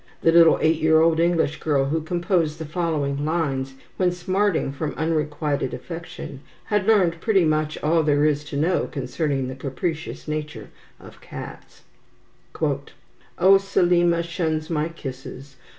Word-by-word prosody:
The 165 - +5
little 165 -1 +6
eight 160 0 +3
year 160 0 +5
old 165 0 +3
English 165 -3 +1
girl 140 -3 +1
who 160 +4 -1
composed 170 -1 0
the 160 - -6
following 150 -4 -1
lines, 140 -5 -1 0.2
when 180 -1 +2
smarting 185 -3 0
from 145 +2 -4
unrequited 150 -3 -1
affection, 165 -5 -8 0.2
had 210 -1 -1
learned 180 -7 +3
pretty 195 -6 +3
much 155 0 0
all 160 +2 +3
there 145 -1 +2
is 150 -1 +1
to 145 -1 -5
know 165 +5 +1
concerning 135 0 -2
the 130 - -5
capricious 150 +6 -4
nature 150 -7 -5 0.3
of - - -15
cats: - - -10 1.6
"Oh, 195 +2 +7
Selima 175 -3 +2
shuns 160 -2 -2
my 155 0 0
kisses! 135 -2 -9
160 Hz, 140 wpm, -23 LUFS, 145-170 Hz, 1.6 s, Oh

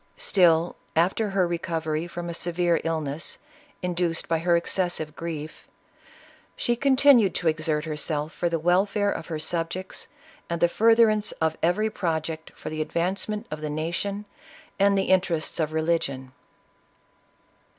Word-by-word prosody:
Still, 175 - +3 0.2
after 190 +6 +2
her 195 -2 +2
recovery 165 -1 -2
from 175 0 -6
a 170 - -4
severe 175 0 0
illness, 160 -2 -3 0.5
induced 175 -2 -1
by 165 -1 +1
her 170 +1 +3
excessive 170 -3 -1
grief, 160 -2 -6 0.9
she 240 - +1
con 270 +2 +3
tinued 255 -8 +6
to 175 - -1
exert 155 -1 0
herself 150 0 -3
for 175 - -1
the 165 - 0
welfare 195 +5 +2
of 160 - -5
her 160 - -3
subjects, 170 +4 -4 0.4
and 170 0 -2
the 175 - +5
furtherance 220 +2 +4
of 160 0 0
every 210 +6 +2
project 160 -3 -3
for - - -7
the 155 0 -2
advance 170 +6 -1
ment 210 +1 -3
of 155 0 -5
the 155 - -3
nation 170 +7 -3 0.5
and 200 0 +4
the 195 - +2
interests 180 -5 +1
of 155 -1 0
religion. 155 -5 -1
170 Hz, 145 wpm, -26 LUFS, 160-190 Hz, 0.9 s, tinued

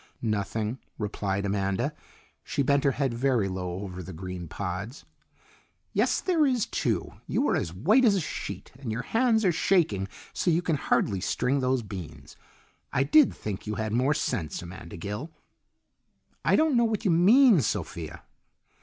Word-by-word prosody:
"Nothing," 105 +2 -1 0.2
replied 100 -2 -2
Amanda. 100 -1 0 0.5
She 140 - -1
bent 140 +1 +2
her 140 - +4
head 135 -3 0
very 120 -4 +1
low 90 -1 -4
over 90 -2 -6
the 95 +1 -8
green 90 0 -6
pods. 100 - -5 0.9
"Yes, - - +2
there 345 -4 +2
is, 255 -6 +2
too! - - -1 0.2
You - - +1
are - - +2
as 80 - -1
white 195 - +3
as 215 -5 +5
a - - +2
sheet, 160 - -6
and 130 -5 -4
your 115 +3 -3
hands 225 - +2
are 180 - +5
shaking 155 - +2 0.3
so - - 0
you 170 +1 +2
can 160 -4 +1
hardly 100 -7 +1
string 125 +7 0
those 130 -1 +1
beans. 95 -6 -9 0.6
I 135 - +2
did 285 - +5
think 105 -1 -6
you 105 - -2
had 110 -1 -2
more 130 +5 +2
sense, 85 - -2
Amanda 85 -1 -9
Gill." 105 - -5 1.1
"I - - +4
don't 310 -3 +3
know 235 0 +4
what 220 0 -1
you 190 - +4
mean, 205 - +6
Sophia." - - -4
120 Hz, 165 wpm, -27 LUFS, -, 1.1 s, mean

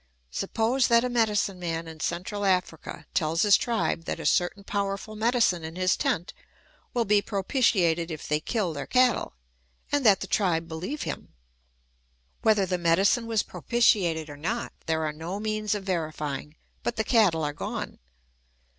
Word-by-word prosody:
Suppose 230 - +1
tliat 235 0 +5
a 250 - 0
medicine 210 -5 +1
man 165 -1 -3
in 160 -1 -10
Central 185 +7 -3
Africa 180 -4 -1
tells 160 +1 +1
his 205 -1 +7
tribe 225 -8 0
that - - -3
a - - -6
certain 185 +3 +1
powerfril 200 +1 -3
medicine 220 -6 +2
in 160 +1 -7
his 185 0 +2
tent 250 - -1 0.6
will 235 -2 0
be 205 0 +4
propitiated 190 - +1
if 155 -3 -6
they 150 0 +1
kill 190 -1 -1
their 145 -2 -5
cattle; 250 - +2 0.6
and 290 -1 +2
that 205 -5 +5
the - - -2
tribe 175 -4 +1
beheve 175 - -4
him. - - -6 1.1
Whether 215 -3 +4
the 180 -1 -1
medicine 195 +8 +3
was 225 -2 +1
propitiated 180 -9 +1
or 145 -1 -9
not, 215 +11 -3
there 160 0 0
are 150 - -2
no 165 +6 -5
means 215 0 -1
of 205 - -4
verifying, 155 -5 -3 0.3
but 240 - -2
the 220 - 0
cattle 205 -9 +3
are 145 -1 -1
gone. - - -5
195 Hz, 165 wpm, -27 LUFS, 165-220 Hz, 1.1 s, his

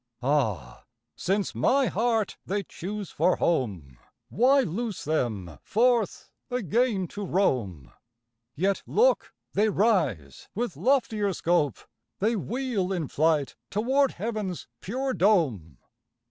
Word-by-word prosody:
Ah, 110 - -1 0.3
since 195 +2 -1
my 275 0 +3
heart 225 +1 0
they 200 +1 -2
choose 200 +3 -6
for 175 +4 +2
home, 95 - -1 0.3
Why 265 +4 +4
loose 215 +1 -3
them, 110 - -2
forth 235 -1 +1 0.2
again 235 - 0
to 205 - -6
roam? 115 - 0 0.6
Yet 190 +5 +1
look: - - +2 0.2
they 215 +2 +3
rise! 155 - 0
with 240 +3 -2
loftier 225 -7 +1
scope 170 -4 +1 0.4
They 220 +4 +1
wheel 225 -3 -2
in 170 -7 -2
flight 155 -2 +1
toward 260 +7 +2
heaven's 210 -3 -4
pure 260 +6 -2
dome. 155 - +1
195 Hz, 110 wpm, -27 LUFS, 145-230 Hz, 0.6 s, Why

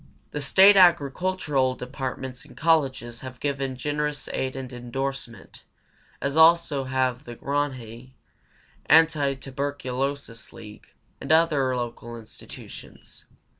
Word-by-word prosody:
The 150 - -4
State 195 +8 +6
agricultural 160 -5 +3
departments 130 0 -6
and - - -17
colleges 135 -7 +1
have 130 -1 -9
given 135 -2 -2
generous 150 +2 -2
aid 130 -1 -2
and 130 -1 -7
indorsement, 120 -2 -6 0.6
as 140 - -2
have 160 - +1
also 160 -4 +5 0.4
the 120 -3 -9
Grange, 130 -4 -3 0.8
Antituberculosis 140 -4 0
League, 105 -2 -12 0.3
and - - -3
other 150 -6 +3
local 120 -1 -5
institutions. 110 -1 -11
135 Hz, 100 wpm, -25 LUFS, 125-150 Hz, 0.8 s, State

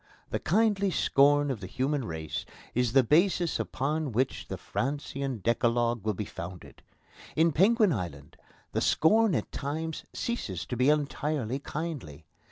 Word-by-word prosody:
The - - 0
kindly 200 0 +2
scorn 145 -3 +3
of 125 - -4
the 95 - -7
human 130 +4 -1
race 80 -5 -4 0.3
is 125 -1 +1
the 135 -1 +6
basis 170 - +2
upon 150 +2 -1
which 130 +4 -1
the - - -5
Francian 135 -3 -3
Decalogue 120 -1 +1
will 110 -2 0
be 105 - -3
founded. 90 -1 -9 0.5
In 165 +1 +4
Penguin 205 - +4
Island 75 - -6 0.4
the - - -1
scorn 215 +4 +4
at - - -2
times 155 +3 -4
ceases 105 - -3
to 125 - -4
be 125 +3 +3
entirely 145 -3 0
kindly. 140 - -6
140 Hz, 145 wpm, -29 LUFS, 115-160 Hz, 0.5 s, the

